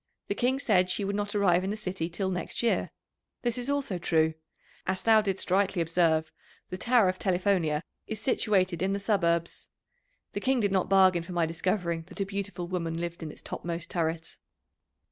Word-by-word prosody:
The - - +2
King 250 +5 +1
said 185 -9 +2
she 200 +2 0
would 200 +1 -1
not 205 0 -2
arrive 185 -3 +3
in 190 - -2
the 210 - -2
city 185 -5 -3
till 190 +3 -2
next 180 +5 -2
year. 235 - +1 0.5
This 245 +2 -1
also 280 -8 -1
is - - -12
true. 160 -1 +2 0.5
As 190 0 -1
thou 220 -1 +6
didst 195 -3 -2
rightly 195 -1 +2
observe, 165 -1 +2 0.4
the 185 - -3
Tower 235 -3 +4
of 185 0 -1
Telifonia 180 -5 +1 0.2
is 220 -2 -3
situated 195 -8 +1
in 190 +1 +1
the 200 - -1
suburbs. 170 -5 0 0.6
The - - -3
King 265 -1 +1
did 205 -3 +1
not 190 -2 +1
bargain 190 -3 +5
for 175 +2 -8
my 170 -1 +2
discovering 170 0 -1
that - - -11
a 195 - +1
beautiful 195 -3 -4
woman 170 -2 -2
lived 170 0 -4
in 160 - -5
its - - -13
topmost 170 0 -5
turret." 165 -1 -2
185 Hz, 190 wpm, -28 LUFS, 170-200 Hz, 0.6 s, thou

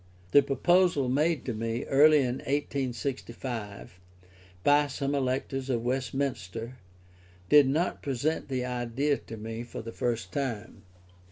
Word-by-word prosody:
The 145 - +8
proposal 145 +1 +2
made 150 +3 +1
to 125 - -2
me, 115 +2 -2
early 150 +2 +6
in 125 -1 -1
1865, 125 -7 -4 0.6
by 145 0 +4
some 140 +1 -2
electors 135 0 -1
of 120 -3 0
Westminster, 125 -3 -3 0.7
did 145 -2 +7
not 160 +7 0
present 140 +3 -1
the 130 -2 -2
idea 125 +3 -1
to 115 - -10
me 110 +1 -5
for 120 -1 -7
the 115 - -6
first 115 -6 -2
time. 120 -6 -4
130 Hz, 125 wpm, -28 LUFS, 115-140 Hz, 0.7 s, The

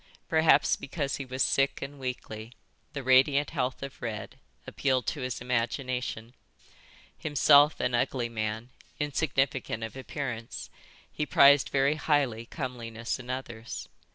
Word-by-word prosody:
Perhaps 160 0 +4
because 140 0 -3
he 135 - -5
was 130 +1 0
sick 135 0 +2
and 140 +1 -7
weakly, 120 -3 -6 0.4
the 140 -3 -4
radiant 135 +3 +4
health 130 -4 -2
of 140 -1 -8
Red 115 -3 -5 0.3
appealed 130 -2 0
to 150 - -3
his 125 -2 -3
imagination. 125 -1 -2 0.9
Himself 145 0 +5
an 125 0 0
ugly 120 0 0
man, 110 +1 -4 0.3
insignificant 135 -6 -1
of 110 +1 -6
appearance, 130 -4 -5 0.4
he 150 - -3
prized 140 0 +6
very 140 +2 +2
highly 135 -7 +1
comeliness 120 -5 -4
in 125 -1 -10
others. 120 -3 -5
130 Hz, 125 wpm, -29 LUFS, 120-140 Hz, 0.9 s, prized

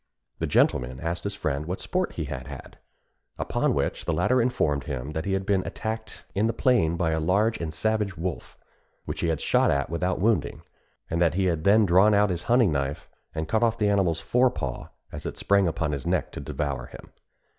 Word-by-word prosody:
The - - -1
gentleman 65 +1 +2
asked 85 +3 -3
his 100 -1 -2
friend 75 -5 -2
what 90 +2 -3
sport 185 0 -1
he 80 - -3
had 65 -3 -6
had; 70 -1 -10 0.6
upon - - 0
which - - -2
the - - 0
latter 130 0 +2
informed 75 - 0
him 70 +1 -4
that 80 +1 -3
he 100 - 0
had 95 0 -1
been 95 -2 +2
attacked 110 -2 -5
in 105 +3 +1
the 115 - 0
plain 100 - +2
by 85 -2 +1
a 80 - 0
large 100 +8 +1
and 80 -2 -3
savage 105 +2 -1
wolf, 85 +1 -5 0.5
which - - -5
he - - +1
had 80 -2 0
shot - - +2
at 70 +1 0
without 90 +2 -1
wounding, 110 +3 0 0.4
and 85 +1 -1
that 85 -1 +3
he 95 0 +1
had 85 -3 0
then 105 +2 +6
drawn 95 +4 +5
out 100 -1 +3
his 85 -1 -2
hunting 120 -6 +5
knife 70 0 -2 0.3
and 80 0 -2
cut 110 +7 +1
off 115 -1 +2
the 105 -2 +2
animal's 95 -5 +2
fore 125 +9 +3
paw 70 - -5 0.2
as - - -6
it - - -6
sprang 100 -2 +3
upon 80 -1 -1
his 70 -3 -4
neck - - 0
to - - -7
devour 70 -5 -3
him. - - -13
90 Hz, 215 wpm, -26 LUFS, 80-105 Hz, 0.6 s, then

